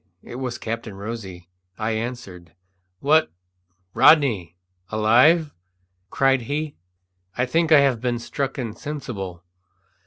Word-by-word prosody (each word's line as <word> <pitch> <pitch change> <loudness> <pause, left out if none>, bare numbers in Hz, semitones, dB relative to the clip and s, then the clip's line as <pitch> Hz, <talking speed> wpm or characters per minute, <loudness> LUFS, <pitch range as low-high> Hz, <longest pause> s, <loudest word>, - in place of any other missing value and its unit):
It 120 - -9
was 125 -2 -4
Captain 115 -2 -5
Rosy. 100 -4 -7 0.3
I 110 +1 -2
answered. 110 -7 -6 0.5
"What, 155 - +3 0.6
Rodney! 110 - +4 0.3
alive?" 125 +9 +4 0.6
cried 135 +3 +2
he. 145 +5 -3 0.6
"I 125 - +2
think 165 +5 0
I 150 -2 +8
have 130 -5 +1
been 120 -1 -1
struck 135 +3 -4
insensible." 115 - -6
120 Hz, 105 wpm, -23 LUFS, 110-140 Hz, 0.6 s, I